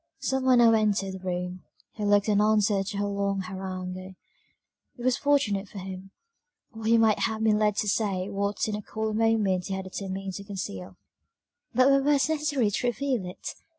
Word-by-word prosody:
Some 265 -1 -1
one 255 -1 +5
now 235 -1 +6
entered 205 -3 +1
the 190 - -7
room; 180 0 -4 0.3
he 215 - -6
looked 205 0 +3
an 205 -1 +3
answer 210 -2 +3
to 200 +1 -5
her 205 - 0
long 200 -1 -1
harangue; 185 0 -6 0.8
it 240 - -8
was 255 0 +3
fortunate 210 -9 +1
for - - -11
him, 190 0 -7 0.6
or 220 -1 -8
he 230 +1 +5
might 220 -2 +4
have 220 -1 -1
been 215 -1 +3
led 210 -1 +2
to 210 - -1
say 195 -3 0
what 200 +1 -1
in 215 - -2
a 210 - -4
cooler 220 +1 -3
moment 215 -5 +1
he 195 - -2
had 190 - -4
determined 190 0 -5
to 200 - -6
conceal; 100 - -6 0.8
but 255 +2 +5
were 275 0 +5
words 285 +1 +2
necessary 290 -8 +1
to 245 - -1
reveal 245 -4 -1
it? 180 - -7
205 Hz, 190 wpm, -27 LUFS, 190-225 Hz, 0.8 s, now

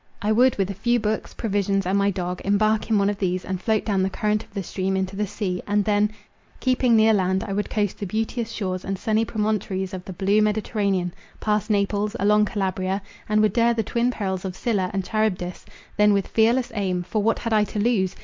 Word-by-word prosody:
I 210 - 0
would 245 +3 +4
with 195 0 0
a - - -4
few 240 +5 +1
books, 215 0 -2
provisions, 200 -3 0
and 185 +2 +1
my 200 0 +3
dog, 180 -2 -3
embark 215 +2 +1
in 220 - +3
one 200 0 +3
of 205 0 -1
these 185 -1 -1
and 185 0 -3
float 220 0 +1
down 200 -3 +1
the 190 - +1
current 210 +2 0
of - - -23
the 200 -1 -4
stream 190 +2 -2
into 190 0 -2
the 210 +1 -1
sea; 190 -3 -3
and 205 -1 +1
then, 210 0 +2 0.5
keeping 255 -2 +2
near 220 0 +5
land, 190 -1 +1
I 195 - -4
would 205 +1 -2
coast 205 -3 -1
the 200 - -3
beauteous 225 +3 -2
shores 185 -4 -3
and 195 0 -3
sunny 220 +3 +1
promontories 210 -4 -2
of 185 -1 -5
the 190 - -7
blue 195 +4 +2
Mediterranean, 205 -4 0 0.3
pass 210 0 0
Naples, 205 +1 0
along 210 +2 +4
Calabria, 190 -1 -1 0.3
and 215 0 +3
would 210 -3 +2
dare 235 0 +3
the 225 - 0
twin 235 +3 0
perils 190 -6 -3
of 185 -2 -4
Scylla 195 -4 0
and 195 -2 -2
Charybdis; 205 -5 -2 0.3
then, 210 0 +5
with 200 -1 +1
fearless 235 +3 +2
aim, 185 -4 -1
(for 210 +4 -1
what 225 +2 +2
had 230 -1 -2
I 215 -1 +4
to 210 - -7
lose?) 205 -4 +1
205 Hz, 225 wpm, -24 LUFS, 190-215 Hz, 0.5 s, near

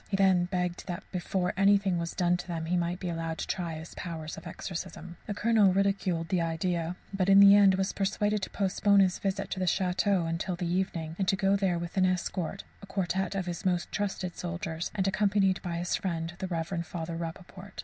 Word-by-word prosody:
He 195 - 0
then 190 -2 +4
begged 180 0 -2
that 180 +1 -4
before 180 0 -1
anything 195 -2 +3
was 170 0 -4
done 175 -1 +2
to 180 - -8
them 165 -2 -3
he 175 +2 0
might 175 0 -1
be 185 - -4
allowed 165 -1 -3
to - - -3
try 170 -3 -3
his 160 +1 -9
powers 160 -3 -6
of - - -10
exorcism. 175 -1 -6
The 205 - -3
Colonel 215 -3 +4
ridiculed 190 -4 0
the 180 -2 +1
idea, 165 +1 -1 0.2
but 195 -1 +1
in 195 0 +8
the 200 0 +9
end 200 -2 +6
was 190 0 -1
persuaded 205 +1 0
to - - -3
postpone 200 +1 +3
his 185 -2 +2
visit 195 -1 -2
to 190 - -2
the 185 - 0
château 180 -2 +1
till 185 0 -2
the 175 0 -4
evening, 170 -3 -2
and 190 - 0
to 195 - +3
go 195 +1 +2
there 190 -3 +1
with 170 +2 -6
an 185 -1 +4
escort, 185 +1 -2 0.2
a 200 - -11
quartette 190 0 -1
of 190 -2 -1
his 175 -2 -5
most 180 -2 0
trusted 190 -3 -3
soldiers, 170 -1 -4
and 195 -2 +1
accompanied 195 -2 +2
by 170 -2 -3
his 175 +1 -2
friend 170 -2 -3
the 190 - -3
Rev. 170 0 -2
Father 170 -1 -5
Rappaport. 180 +4 -8
185 Hz, 215 wpm, -29 LUFS, 170-195 Hz, 0.2 s, the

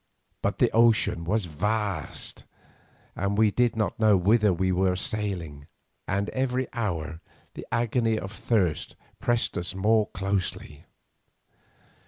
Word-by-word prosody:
But - - -1
the - - +3
ocean 115 -7 +3
was 105 +3 0
vast, 100 +1 -3 0.7
and 100 +1 -1
we 110 -1 +4
did 120 +2 +2
not 110 -1 -1
know 110 -3 +5
whither 105 +3 +4
we 95 +1 +1
were 90 0 +2
sailing, 90 -8 -3 0.4
and 100 +1 0
every 130 0 -1
hour 85 - -3 0.3
the - - -9
agony 115 -1 +1
of 95 -2 -5
thirst 100 -7 0 0.2
pressed 120 -6 0
us 90 +2 -4
more 105 +2 +3
closely. 95 -5 -3
100 Hz, 125 wpm, -26 LUFS, 90-110 Hz, 0.7 s, know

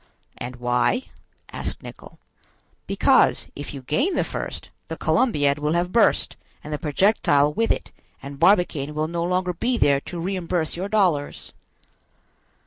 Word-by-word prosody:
"And 125 +1 -6
why?" 125 - 0 0.4
asked - - -5
Nicholl. - - -12 0.7
"Because, - - +3
if 145 - -7
you 135 -2 -8
gain 280 - 0
the - - +2
first, - - -6 0.2
the - - -6
Columbiad 145 - +1
will 150 +1 0
have 175 +1 0
burst, 230 -1 +2 0.3
and 150 - -6
the 150 - -2
projectile 150 -3 +2
with 225 +7 0
it; - - -1 0.3
and 140 0 -9
Barbicane 165 -5 +2
will 155 +1 0
no 170 +1 -2
longer 180 +1 0
be 240 +8 -1
there 140 -8 +3
to 175 - -7
reimburse 175 -2 -2
your 190 +3 -4
dollars." 180 -9 0
170 Hz, 145 wpm, -23 LUFS, 145-190 Hz, 0.7 s, Because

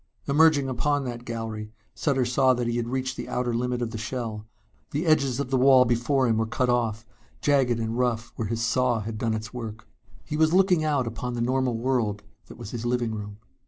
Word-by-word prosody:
Emerging 145 -1 +4
upon 145 +3 0
that 120 -1 -6
gallery, 110 -2 -5 0.2
Sutter 135 -4 0
saw 130 +1 +3
that 120 0 -2
he 120 0 -1
had 120 -1 -2
reached 130 +1 -2
the - - -6
outer 125 -1 -1
limit 125 +1 -1
of 115 - -3
the 110 - -5
shell. 115 -2 -4 0.4
The 150 +5 -2
edges 140 -5 +2
of 140 -2 -3
the 135 - +3
wall 130 -1 +6
before 125 +3 +1
him 115 -2 +2
were 110 - 0
cut 125 +2 0
off, 115 -2 0 0.3
jagged 135 -5 +2
and 115 0 -2
rough, 120 -2 -1
where 110 - -3
his 115 +2 -2
saw 120 -1 +1
had 110 +1 -5
done 115 -1 0
its 110 +2 -6
work. 110 -3 -7 0.4
He 150 - -3
was 160 +1 +3
looking 185 -3 +4
out 145 -4 +1
upon 115 +2 -4
the 120 - -2
normal 125 -1 +1
world 115 -4 -1 0.2
that - - -12
was 100 - -8
his 120 -2 -5
living 120 -2 0
room. 105 -1 -6
120 Hz, 215 wpm, -26 LUFS, 115-130 Hz, 0.4 s, wall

